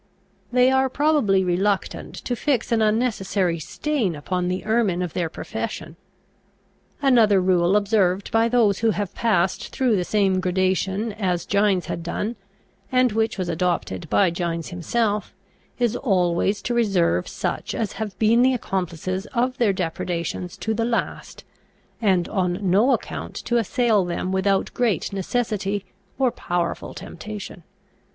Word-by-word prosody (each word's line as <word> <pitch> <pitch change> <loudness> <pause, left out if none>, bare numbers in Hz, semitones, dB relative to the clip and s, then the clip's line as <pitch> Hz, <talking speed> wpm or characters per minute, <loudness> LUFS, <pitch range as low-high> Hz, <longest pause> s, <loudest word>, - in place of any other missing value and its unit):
They 250 +1 +4
are 265 0 +3
probably 275 -10 +2
reluctant 190 +2 -1
to 245 - -1
fix 250 -1 0
an 230 -1 +3
unnecessary 210 -6 +1
stain 230 - -1
upon 180 +4 -2
the 180 +1 -2
ermine 210 -5 +1
of 175 - -5
their 170 -2 -1
profession. - - -5 1.1
Another 225 -7 +5
rule 180 0 +3
observed 200 -2 +1
by 225 +1 +3
those 225 -5 +3
who 230 - +2
have 205 -2 -2
passed 190 -6 +1
through 250 -4 +1
the 180 - +1
same 195 -1 +2
gradation 190 +3 0
as 180 -5 -1
Gines 200 -2 +2
had 170 - -4
done, 205 +7 -3 0.6
and 255 -1 +3
which 220 +1 0
was 185 -2 -2
adopted 170 - -2
by 105 +11 +3
Gines 170 -1 -3
himself, 205 +4 -1 0.4
is 240 -2 +1
always 195 -3 +1
to 240 - -1
reserve 190 - +2
such - - -3
as 215 -3 -2
have 215 -3 -5
been 230 +2 +4
the 260 +1 +4
accomplices 185 -2 -3
of 255 +3 0
their 230 -4 +4
depredations 175 -1 -3
to 220 - 0
the 230 +1 -1
last, 230 0 -3 0.6
and 190 -5 +2
on 180 -3 0
no 215 +8 +4
account - - -3
to 240 - +1
assail 230 -2 +2
them 175 +1 -3
without 190 +1 +1
great 230 -4 0
necessity 205 -1 -1 0.3
or 260 -2 +2
powerful 175 -4 -3
temptation. 205 0 -8
200 Hz, 145 wpm, -23 LUFS, 180-230 Hz, 1.1 s, Another